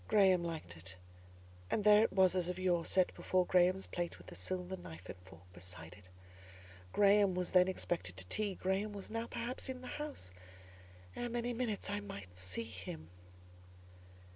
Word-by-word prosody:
Graham 190 -5 +5
liked 160 - -5
it, 90 +2 -8 0.7
and 210 - +1
there 210 0 +8
it 225 - +3
was 190 -1 +5
as 180 -2 +1
of 180 0 -3
yore—set 180 0 +2
before 185 -1 +1
Graham's 185 +2 +4
plate 175 -1 -3
with - - -15
the - - -10
silver 185 0 -2
knife 85 - -10
and - - -6
fork 90 -2 -15
beside 90 -2 -8
it. 90 -1 -16 0.8
Graham 200 - +5
was 180 -1 -1
then 180 0 +6
expected 170 - -1
to 95 - -4
tea: 200 - 0
Graham 195 +3 -1
was 200 0 -7
now, 230 +1 -2
perhaps, 245 +3 -3
in 255 -1 -4
the - - -9 0.2
house; 290 - -5 0.8
ere 240 - -3
many 240 +1 -1
minutes 230 -4 -2
I 205 0 -1
might 100 - -8
see 95 +4 -3
him. 90 -7 -8
185 Hz, 170 wpm, -36 LUFS, -, 0.8 s, there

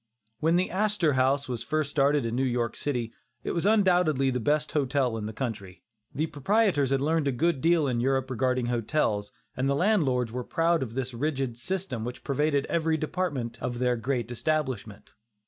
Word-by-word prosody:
When 165 +2 +2
the 180 +1 +1
"Astor 195 -5 +1
House" 135 +2 +2
was 120 -3 -3
first 150 +3 -1
started 140 -2 +2
in 115 0 -2
New 130 - +1
York 120 -2 -1
City, 120 -6 -3 0.3
it - - -2
was 170 +3 0
undoubtedly 180 -10 +3
the 125 - -1
best 150 +6 0
hotel 135 -4 +1
in 105 -1 -4
the - - -4
country. 105 -6 -5 0.3
The 155 - -1
proprietors 160 - +1
had 135 0 +1
learned 155 0 +1
a - - +2
good 145 +2 0
deal 165 -1 +3
in 120 -3 0
Europe 130 +1 0
regarding 130 0 0
hotels, 115 -3 0 0.2
and 130 +2 0
the 140 - +2
landlords 140 - +2
were 125 +1 -4
proud 165 +5 +1
of 120 -3 -4
the 130 -2 -1
rigid 135 -3 -2
system 175 - -3
which 120 +2 -6
pervaded 145 0 +1
every 160 -1 0
department 145 -8 -3
of 120 -1 -3
their 125 0 +1
great 120 0 -2
establishment. 130 -6 -3
135 Hz, 185 wpm, -27 LUFS, 120-155 Hz, 0.3 s, undoubtedly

